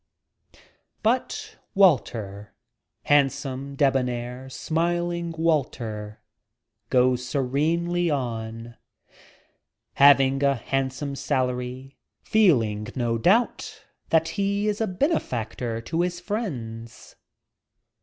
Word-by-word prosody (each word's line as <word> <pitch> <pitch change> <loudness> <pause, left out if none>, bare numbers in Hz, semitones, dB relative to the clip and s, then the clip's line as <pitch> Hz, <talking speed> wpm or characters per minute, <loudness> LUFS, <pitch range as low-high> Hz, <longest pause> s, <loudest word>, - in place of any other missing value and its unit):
But 235 +4 -1 0.2
Walter, 110 - +2 0.5
handsome, 140 -1 +1
debonair, 125 -2 0
smiling 170 +3 -1
Wal 160 -3 +3
ter, 105 -3 -7 0.7
goes 125 -1 +3
serenely 160 +7 0
on, 115 -4 -4 1.2
having 135 -1 +5
a 140 -1 +3
handsome 135 +3 -2
salary, 130 -1 -3 0.2
feeling, 115 - +2
no 120 -3 0
doubt, 210 - +1 0.3
that 160 0 +3
he 200 +1 -1
is 210 +1 -1
a 220 - +1
benefactor 125 - -2
to 165 +8 -2
his 175 0 -1
friends. 125 - -6
135 Hz, 85 wpm, -25 LUFS, 120-170 Hz, 1.2 s, having